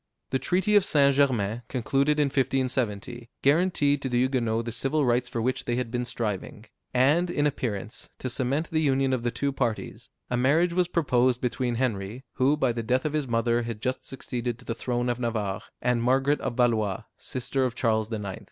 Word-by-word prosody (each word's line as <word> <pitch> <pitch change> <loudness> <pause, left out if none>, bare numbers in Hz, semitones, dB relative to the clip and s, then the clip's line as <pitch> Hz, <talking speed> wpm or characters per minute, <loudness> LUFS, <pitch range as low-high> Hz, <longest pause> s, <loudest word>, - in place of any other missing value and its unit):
The 130 - +1
treaty 190 +7 +1
of 205 - +6
St. 140 -5 +4
Germain, 120 -6 +1
concluded 140 +4 +1
in 150 - +4
1570, 125 -4 -1
guaranteed 145 -2 +3
to 130 - -2
the 120 - 0
Huguenots 120 -3 +1
the 120 - -3
civil 135 +6 0
rights 120 0 +1
for 115 - -2
which 130 +2 -1
they 120 - 0
had 125 -2 -2
been 125 0 -1
striving; 110 -2 -4 0.3
and, 145 +8 +3
in 145 -4 0
appearance, 115 -6 -3
to - - -4
cement 135 +5 -1
the 160 -1 +1
union 135 -2 +2
of 130 - 0
the 120 - 0
two 130 +4 -1
parties, 120 -5 -3 0.2
a - - +2
marriage 155 +8 +3
was 180 0 +2
proposed 130 -7 +2
between 125 -1 -1
Henry, 115 -1 -2
who, 140 +3 +3
by 130 -4 +2
the 115 0 -3
death 125 +4 0
of 155 - -1
his 150 -3 -1
mother, 115 0 +1
had 115 -2 -5
just 130 +3 -2
succeeded 120 -3 -4
to 125 - -16
the 115 - -2
throne 120 +1 -2
of 120 0 -1
Navarre, 110 -5 -2 0.2
and 125 -1 +2
Margaret 135 +4 +2
of 130 -3 -3
Valois, 110 -6 +1 0.2
sister 130 +1 -2
of 125 -2 -1
Charles 110 -2 0
IX. 100 -4 -4
125 Hz, 200 wpm, -26 LUFS, 115-140 Hz, 0.3 s, of